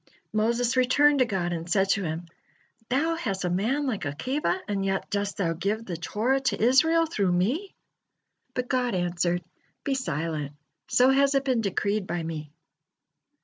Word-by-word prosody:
Moses 235 +3 +1
returned 285 +3 +4
to 255 - +5
God 185 -6 -1
and 165 0 -5
said 195 +2 +2
to 200 - +2
Him: 165 +1 -3 0.6
"Thou 295 +6 +1
has 200 - -2
a 180 - 0
man 235 +11 0
like 230 -9 -2
Akiba, 255 - -1
and 200 -1 -1
yet 195 0 -2
dost 200 0 -1
Thou 170 -4 0
give 205 +7 -2
the 180 - -4
Torah 220 +10 0
to 265 -1 -1
Israel 320 +8 +4
through 200 - 0
me!" 245 - 0 0.8
But 250 0 -2
God 250 -4 0
answered: 175 0 0 0.4
"Be 280 - 0
silent, 155 - -2 0.3
so 255 +2 +5
has 275 +1 +3
it 275 0 +2
been 255 -4 +2
decreed 200 0 -1
by 170 0 -2
Me." 155 -2 -5
210 Hz, 165 wpm, -26 LUFS, 175-260 Hz, 0.8 s, to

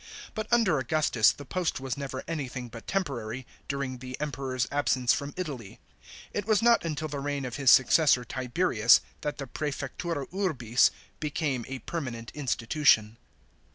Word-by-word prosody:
But, 215 -1 -4
under 215 - +4
Augustus, 130 -4 +3
the 145 - -10
post 180 +2 -1
was 130 -2 -3
never 135 -2 -5
anything 130 -6 -4
but 115 0 -11
temporary, 130 - -3 0.2
during 140 -3 -3
the 130 0 -7
Emperor's 130 -3 -2
absence 130 -3 +2
from 140 0 -3
Italy. 135 - -6 0.5
It 205 0 -3
was 215 -1 +3
not 235 0 +5
until 155 -1 -3
the 145 -1 -5
reign 140 -1 -2
of 125 0 -5
his 140 -3 +3
successor 130 0 +5
Tiberius 125 -2 +3 0.2
that 150 - -3
the 140 - -5
prssfectura 145 +2 -4
urbis 130 - +2 0.3
became 145 -5 -2
a 135 - -4
permanent 120 -8 -5
institution. 125 -4 +2
140 Hz, 150 wpm, -28 LUFS, 125-155 Hz, 0.5 s, not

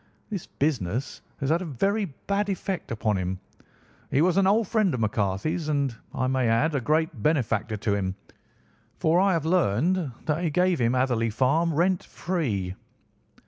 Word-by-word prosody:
This 195 -5 -4
business 130 - -2 0.2
has 135 +2 +1
had 170 +2 +2
a - - -4
very 195 - 0 0.2
bad 200 +1 0
effect 190 -1 -3
upon 110 -2 0
him. 95 0 -3 0.7
He 135 - +1
was 180 0 +3
an 195 -1 +4
old 215 +1 +3
friend 215 -4 +2
of - - -4
McCarthy's, 110 - -1
and, 140 -5 0 0.2
I 130 - -1
may 130 -1 +1
add, 135 +8 +2
a 140 - 0
great 160 +6 0
benefactor 115 -8 +1
to 100 0 0
him, 95 -2 -1 0.8
for 165 +2 +3
I 195 0 +4
have 165 -3 0
learned 165 - +2
that 155 +3 0
he 170 - +1
gave 180 0 +2
him 120 +1 +2
Hatherley 125 -3 +1
Farm 140 +9 +2
rent 175 +3 +2
free." 115 - -2
150 Hz, 170 wpm, -26 LUFS, 115-180 Hz, 0.8 s, an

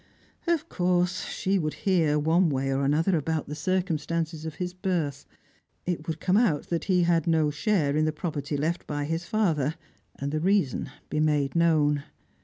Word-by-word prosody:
Of 330 -2 +1
course 180 - 0
she 195 +1 0
would 155 -2 -2
hear, 165 -6 +3
one 165 +4 +3
way 135 -1 0
or 135 +1 0
another, 160 +7 +2
about 160 0 -1
the 150 - -5
circumstances 165 -1 -1
of 160 -2 -5
his 180 +1 -4
birth. 170 -7 -2 0.6
It 170 -3 -3
would 160 -1 -3
come 185 +3 +2
out 205 -11 +2
that 170 -1 -1
he 180 -2 +3
had 170 -2 +2
no 160 -2 +3
share 150 -3 +1
in 155 0 +2
the 155 - +1
property 150 -2 -3
left 165 +4 -2
by 145 -1 -2
his 165 +3 -2
father, 160 -9 +1 0.4
and 140 +1 -4
the 155 - 0
reason 180 -7 +1 0.2
be 150 - 0
made 150 -2 +1
known. 150 -4 +3
160 Hz, 180 wpm, -27 LUFS, 150-180 Hz, 0.6 s, hear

